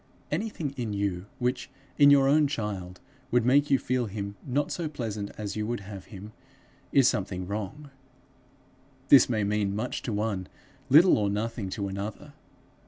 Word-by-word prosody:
Anything 165 -4 -2
in 115 -4 -3
you, 100 -2 -2
which, 125 +1 -2 0.3
in 145 -1 +8
your 140 -1 +6
own 150 +1 +4
child, 100 -9 -4 0.3
would 120 -2 +2
make 140 +3 +4
you 135 - +5
feel 125 -2 -1
him 100 0 -5
not 145 +3 -1
so 165 -3 -3
pleasant 110 -8 -4
as 105 -1 -4
you 105 0 -2
would 120 -2 -3
have 100 -1 -9
him, 105 0 -10 0.6
is 135 -3 +5
something 95 -5 -1
wrong. 110 +9 -6 1.2
This 140 - +8
may 110 -3 0
mean 100 -1 0
much 115 +4 -3
to 120 - -4
one, 105 -3 -2 0.4
little 160 +1 +7
or 100 -1 +1
nothing 105 0 -3
to 100 +1 -3
another. 100 +2 -6
110 Hz, 165 wpm, -27 LUFS, 100-135 Hz, 1.2 s, in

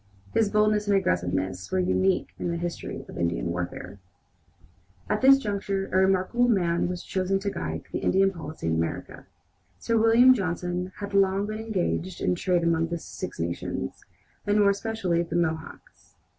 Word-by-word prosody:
His 220 -2 +3
boldness 210 0 +2
and 200 -1 +4
aggressiveness 95 - -1
were 190 - +1
unique 185 +1 +1
in - - -2
the 170 - -1
history 170 0 -5
of - - -9
Indian - - -1
warfare. 90 +3 -5 1.1
At - - 0
this 270 +1 +8
juncture 200 -4 -2
a - - +3
remarkable 190 +6 +3
man 175 -7 +2
was 180 0 -4
chosen 190 +1 0
to 200 +1 -3
guide 80 - -4
the - - -2
Indian 195 +1 +3
policy 160 - -8
in 80 - +1
America. 80 0 -4 0.5
Sir 230 - 0
William 230 +3 +7
Johnson 180 -3 -2
had 200 -1 -7
long 195 0 +3
been 215 +1 -5
engaged 190 -4 -2
in - - +1
trade 175 -1 +1
among 165 -1 +2
the 170 0 -3
Six - - -7
Nations, 85 -5 -4 0.4
and 205 +1 +3
more 200 -1 +5
especially 200 -4 -1
the 165 -1 -4
Mohawks. 160 -2 -4
185 Hz, 165 wpm, -26 LUFS, 165-200 Hz, 1.1 s, this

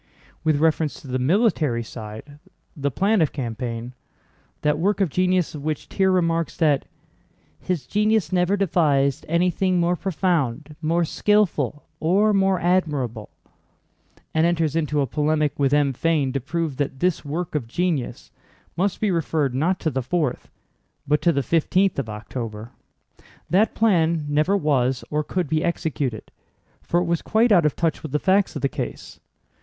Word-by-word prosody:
With 155 -2 +2
reference 160 -1 +1
to - - -12
the 130 0 -2
military 150 - +2
side—the 125 +6 -8
plan 195 - +2
of 155 - +2
campaign—that 125 +4 -5
work 200 +4 +1
of 190 -7 +1
genius 185 0 +1
of 145 -2 -7
which 155 -1 -3
Thiers 190 -1 +1
remarks 165 -2 0
that, 150 -5 +2 0.7
"His 175 -8 -3
genius 210 - +1
never 185 +2 +2
devised 150 -7 +1
anything 180 +2 +1
more 175 +1 +2
profound, 160 -6 -1
more 165 +2 +1
skillful, 160 - +1
or 200 +6 +3
more 195 -2 +2
admirable," 145 - 0 1.0
and 160 +1 +3
enters 165 -3 0
into 150 -2 0
a - - +2
polemic 150 +2 0
with 135 -1 +2
M. 145 -2 +3
Fain 145 -2 0
to 135 - -1
prove 160 0 -3
that 140 -2 -2
this 180 +1 0
work 160 +4 -4
of 145 -7 -2
genius 160 -1 -2 0.4
must 190 +2 0
be 210 -3 +2
referred 160 -5 0
not 170 +8 0
to 160 - 0
the 130 0 -1
fourth 135 0 -2 0.6
but 150 +1 +2
to 170 - +4
the 140 -4 0
fifteenth 180 +4 +1
of 120 -5 -3
October—that 115 - -4
plan 170 -8 +2
never 155 +7 +2
was 135 -6 +1
or 150 0 0
could 180 +1 -2
be 155 +2 0
executed, 145 -8 -2 0.5
for 175 - 0
it - - -1
was 170 -1 0
quite 225 +2 +2
out 175 -6 +5
of 150 - -2
touch 165 -2 -1
with 155 - -7
the 150 - +1
facts 195 +4 +2
of - - -5
the - - +4
case. - - -6
155 Hz, 155 wpm, -23 LUFS, 140-180 Hz, 1.0 s, out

